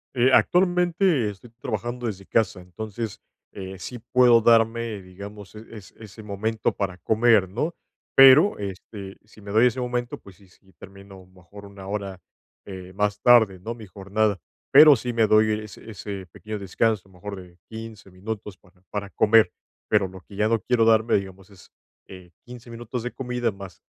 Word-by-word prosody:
Eh, 125 +2 +3
actualmente, 175 - +2
estoy 110 +4 -12
trabajando 120 +3 -4
desde 95 -2 -6
casa. 100 -4 0
Entonces, 110 +4 -7 0.3
eh, 95 -1 -8
sí 120 +5 -8
puedo 120 -2 +6
darme, 115 -2 +2
digamos, 100 +3 -11
eh, 110 +1 -11
es 105 -5 -12
ese 110 0 -12
momento 110 +2 -2
para 95 -2 -4
comer, 110 -1 +3
¿no? 135 - -3 0.4
Pero 135 +9 +7
este, 100 0 -8
si 105 0 -18
me 100 0 -9
doy 115 +4 +5
ese 125 +1 -2
momento, 125 0 -3
pues, 95 -2 -16
sí 100 - -21
sí 95 +1 -26
termino 100 -1 -14
mejor 95 +2 -15
1 100 -1 -12
hora, 100 -2 -5 0.5
eh, 95 -2 -9
más 105 0 -1
tarde, 110 -7 +5
¿no?, 115 +6 -6
mi 110 -2 -11
jornada. 100 +1 -1 0.3
Pero 150 -2 +9
sí 120 +1 -4
me 115 -2 +2
doy 110 +1 +4
es 105 - -11
ese 100 -3 -8
pequeño 105 0 -7
descanso, 100 0 -1
a - - -22
lo - - -22
mejor 100 +2 -7
de 90 -1 -17
15 110 -3 -10
minutos 100 +1 -7
para 90 -1 -27
para 100 -1 -4
comer. 110 0 +4 0.4
Pero 95 - +2
lo 95 0 -12
que 100 - -15
ya 105 +1 +1
no 115 0 +1
quiero 115 +2 +1
darme, 110 0 +3
digamos, 95 0 -5
es, 95 - -18 0.4
eh, 90 -2 -13
15 120 -1 -12
minutos 120 +1 -6
de 125 - -4
comida, 125 -3 -2
más 95 -2 -12
105 Hz, 180 wpm, -24 LUFS, 95-115 Hz, 0.5 s, Pero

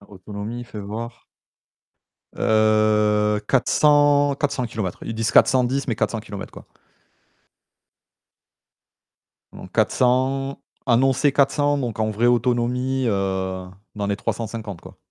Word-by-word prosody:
Alors 100 0 -19
autonomie, 105 +5 -7
fais 105 -3 -9
voir. 115 +3 -7 1.1
Heu 105 -1 +2
400- 145 +1 +3
400 140 -3 -2
kilomètres. 110 -6 -4
Ils 115 - -5
disent 115 0 -1
410, 130 +1 +3
mais 120 - +1
400 110 +1 -2
kilomètres 100 -3 -8
quoi. - - -13 2.9
Donc - - -12
400 130 +2 +1 0.3
annoncé 135 +4 +3
400 145 +1 +2
donc 120 -5 -4
en 110 0 0
vrai 110 +3 0
autonomie, 125 +2 +1
heu, 95 -2 -2 0.3
dans 105 -1 -3
les 100 0 -1
350 110 -4 -5
quoi. - - -14
115 Hz, 110 wpm, -22 LUFS, 105-130 Hz, 2.9 s, 400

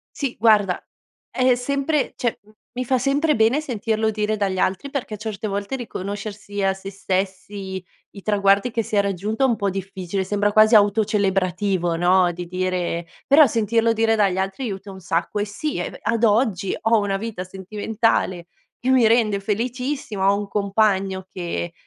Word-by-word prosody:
Sì 275 -4 -3
guarda, 210 -4 +4 0.5
è 255 - -1
è - - +5
sempre 280 +4 -1
cioè 240 -2 -1
m 210 - -21 0.3
mi 255 - -1
fa 255 0 +1
sempre 285 +4 +2
bene 225 +6 +3
sentirlo 220 -5 -1
dire 215 0 -1
dagli 190 -2 -1
altri, 230 +9 -1
perché 245 -6 -4
certe 215 0 -5
volte 200 +5 -3
riconoscersi 205 -2 -5
a 195 0 +2
sé 195 +1 -8
stessi, 190 0 -3 0.3
i 200 - -11
traguardi 200 +2 +2
che 230 -1 -1
si 210 - -4
è 200 - +5
raggiunto 200 +4 -3
è 265 - +5
un 235 - +2
po' 200 -3 -1
difficile, 190 0 -4
sembra 205 +2 0
quasi 215 +2 +6
autocelebrativo, 195 -4 +2
no, 180 +1 +3
di 175 0 -6
dire 180 -1 -2 0.2
però 285 +1 +7
sentirlo 230 +1 +1
dire 225 0 +2
dagli 195 -4 +2
altri 195 +7 -2
aiuta 200 -2 -6
un 190 - -10
sacco, 175 +3 -2
e 205 - 0
sì 215 +7 -4
e, 175 - -2
beh, - - -12
ad 230 +2 0
oggi 210 -3 +2
ho 225 0 +3
una 200 -1 -1
vita 210 -3 -5
sentimentale 190 -1 -1 0.3
che 255 - -2
mi 250 -4 +5
rende 220 -3 +3
felicissima, 230 -1 -1
ho 200 - +1
un 205 -1 -4
compagno 195 -2 0
che 175 -1 -4
205 Hz, 175 wpm, -22 LUFS, 190-225 Hz, 0.5 s, però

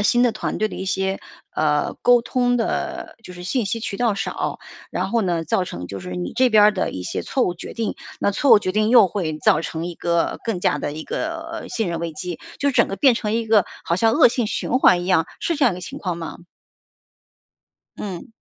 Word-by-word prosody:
呃， - - +1
新 240 +3 +3
的 245 -2 +3
团 215 - -3
队 215 - +2
的 - - -8
一 190 - -5
些， 190 +1 -1 0.3
呃， 150 -1 +1
沟 245 0 +6
通 245 +1 +1
的 230 - -3
就 180 - -10
是 180 0 -9
信 240 +4 0
息 230 +3 -2
渠 205 -3 -4
道 230 -4 +1
少， - - -3 0.3
然 - - -2
后 230 -1 +1
呢 170 -4 -1
造 185 - +1
成 90 - -6
就 100 0 -7
是 90 0 -7
你 90 0 -4
这 255 -1 +3
边 215 -2 +6
儿 210 - +6
的 185 - -1
一 90 - -6
些 - - -3
错 265 - 0
误 175 - -1
决 175 - -8
定， 230 -2 -2 0.2
那 200 - +1
错 275 +7 +1
误 225 - +9
决 185 -2 -2
定 215 +2 +2
又 235 -4 +7
会 165 -5 -3
造 155 - +3
成 165 +1 -4
一 175 - -5
个 170 0 0
更 225 -6 -1
加 150 - +1
的 145 - -3
一 155 +1 -7
个 330 +1 -4
信 220 -5 -2
任 170 -1 -3
危 170 -1 -3
机。 175 +2 -6 0.2
就 280 0 +1
整 235 -4 +3
个 195 - -4
变 255 +4 +5
成 210 -2 -2
一 230 0 0
个 215 -4 +4 0.2
好 170 - +1
像 225 +5 +3
恶 - - +7
性 235 -2 0
循 - - -3
环 175 -1 +5
一 - - -6
样， 180 -4 +3
是 340 - -1
这 295 -2 +1
样 235 - +4
一 - - -6
个 180 - -8
情 - - -8
况 175 -3 -3
吗？ 165 - -6 1.6
嗯。 185 -5 -6
195 Hz, 265 characters per minute, -22 LUFS, 170-230 Hz, 1.6 s, 误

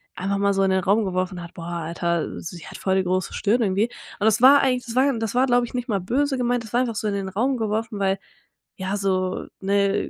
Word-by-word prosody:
einfach 195 +2 -1
mal 200 0 +2
so 195 0 +2
in 190 - +2
den 190 0 +2
Raum 205 +4 +3
geworfen 185 -1 -2
hat: 170 - -11
„Boah 165 - -7 0.2
Alter, 170 +1 -2
sie 170 -1 -8
hat - - -9
voll 190 -1 0
die 190 - +2
große 185 0 -1
Stirn 230 +4 +1
irgendwie.“ 205 +2 +1 0.3
Und 205 - 0
das 220 +1 +3
war 275 +3 +8
eigentlich 250 -2 +1
das 235 -1 -6
war 270 +2 +4
das 225 0 -3
war, 255 +1 +4
glaube 245 -1 +3
ich, - - -13
nicht 245 0 -3
mal 200 -3 +1
böse 265 +8 0
gemeint, 245 -1 0
das 225 0 -12
war 245 - +3
einfach 235 -3 -2
so 215 0 -2
in 205 - 0
den 195 -1 -3
Raum 250 +8 0
geworfen, 220 0 -2
weil, 195 0 +1 0.6
ja, 190 +1 -2
so 185 -2 -1 0.2
ne, 200 0 +1
200 Hz, 255 wpm, -23 LUFS, 190-240 Hz, 0.6 s, war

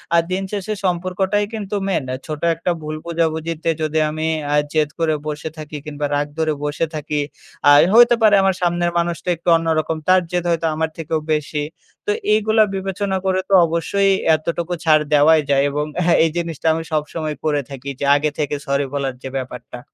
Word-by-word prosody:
আ - - +6
দিন 190 +1 -1
শেষে 210 +1 -3
সম্পর্কটাই 185 +3 0
কিন্তু 210 -2 -4
মেইন। 180 -7 0
আ - - -1
ছোট 155 -1 -5
একটা 170 +2 -1
ভুল 155 0 -5
বুঝাবুঝিতে 165 -1 -1
যদি 155 0 0
আমি 155 +1 -3 0.2
অ্যা 145 - +1 0.2
জেদ 155 -2 +2
করে 160 -1 +2
বসে 150 +1 -4
থাকি 155 0 -7
কিংবা 150 -1 -4
রাগ 145 0 0
ধরে 160 -1 +1
বসে 150 +2 -1
থাকি। 150 0 -2 0.5
আই 145 - +7
হইতে 240 +1 +7
পারে 210 -2 +6
আমার 190 -1 +2
সামনের 175 0 +1
মানুষটা 170 +1 -2
একটু 170 +1 -2
অন্যরকম, 160 -1 -1
তার 185 0 +5
জেদ 175 -1 0
হয়তো 165 -1 0
আমার 160 +1 -1
থেকেও 160 0 -2
বেশি। 150 0 -2 0.4
তো 415 - +1 0.2
এইগুলা 220 +1 +4
বিবেচনা 195 +1 -2
করে 185 0 +1
তো - - 0
অবশ্যই 195 +4 +1 0.2
এতটুকু 170 +2 -3
ছাড় 155 -1 +5
দেওয়াই 155 +2 +6
যায়। 140 0 +3
এবং 150 +1 -1 0.2
হ্যাঁ 170 0 +4
এই - - +1
জিনিসটা 165 -2 -3
আমি 165 0 -3
সবসময় 155 0 -2
করে 145 -2 +1
থাকি 135 0 -7
যে - - -1
আগে 150 +1 +1
থেকে 145 -1 -1
সরি 140 -1 0
বলার 135 -2 -1
যে 130 - -5
ব্যাপারটা। 125 -1 -7
160 Hz, 185 wpm, -20 LUFS, 150-180 Hz, 0.5 s, আই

